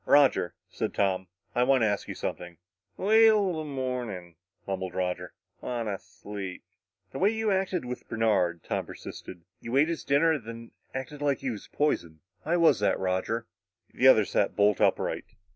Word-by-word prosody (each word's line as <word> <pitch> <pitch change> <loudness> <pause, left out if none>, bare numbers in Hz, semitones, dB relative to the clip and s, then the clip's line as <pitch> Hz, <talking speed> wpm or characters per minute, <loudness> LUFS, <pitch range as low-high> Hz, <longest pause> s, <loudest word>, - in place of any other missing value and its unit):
"Roger," 140 -11 +4 0.2
said - - -3
Tom, 95 -2 +1 0.3
"I 120 - +1
want 130 -1 +4
to - - +4
ask 100 -1 -1
you - - -5
something." 85 -1 -5 0.4
"Wait'll 210 -3 +5
the - - -3
mornin'," 125 - -4 0.3
mumbled 95 -2 -4
Roger. 90 -1 -2 0.3
"Wanta 115 -6 -3
sleep." 100 -3 -8 0.5
"The - - -6
way 195 - +5
you 220 -1 0
acted 190 -5 0
with 125 0 -7
Bernard," 95 -7 +1
Tom - - -2
persisted. 85 -2 -9 0.2
"You 120 +3 -2
ate 150 +4 +4
his 170 - -3
dinner 145 +4 +3
and 150 -7 -1
then 115 +1 -9 0.2
acted 135 +3 -5
like 140 -2 +2
he 135 -2 -3
was 105 - -8
poison. 85 - 0 0.2
Why 165 +3 0
was 165 - +5
that, 105 - +2
Roger?" 95 +5 -1 0.5
The - - +4
other - - +7
sat - - 0
bolt 105 -1 +3
upright. - - 0
115 Hz, 170 wpm, -28 LUFS, 95-150 Hz, 0.5 s, other